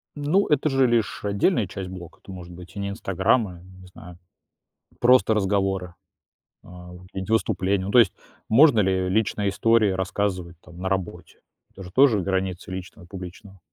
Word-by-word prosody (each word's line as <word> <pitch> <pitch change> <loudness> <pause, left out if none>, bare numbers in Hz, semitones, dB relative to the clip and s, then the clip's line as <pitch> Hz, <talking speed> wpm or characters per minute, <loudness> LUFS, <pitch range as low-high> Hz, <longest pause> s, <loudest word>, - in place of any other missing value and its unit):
Ну, 155 +8 +1
это 150 0 +1
же 135 -1 +3
лишь 115 -3 0
отдельная 105 - +1
часть 95 -3 -7
блока. 90 -2 -10
Это 95 - -11
может 90 -1 -10
быть 90 +2 -13
и - - -6
не 100 0 -3
"Инстаграм", 100 +3 0
а, 90 -1 -11
не 95 0 -16
знаю, 90 -1 -13 0.8
просто 125 -2 +4
разговоры, 95 -3 -1 0.7
а, 90 0 -13
какие-нибудь 95 +3 -8
выступления. 100 -3 0
Ну, 100 - -4
то 125 - +4
есть 115 - +5 0.4
можно 125 -1 +6
ли 95 -1 +1
личные 105 0 0
истории 110 +1 +2
рассказывать 95 -2 -3
там 90 -1 -16
на 95 +1 -3
работе? 90 -3 -5 0.3
Это 95 - -11
же 90 - -10
тоже 125 -5 +4
границы 95 -1 -3
личного 90 -1 -8
и 85 - -19
публичного. 95 0 -10
95 Hz, 170 wpm, -24 LUFS, 90-110 Hz, 0.8 s, можно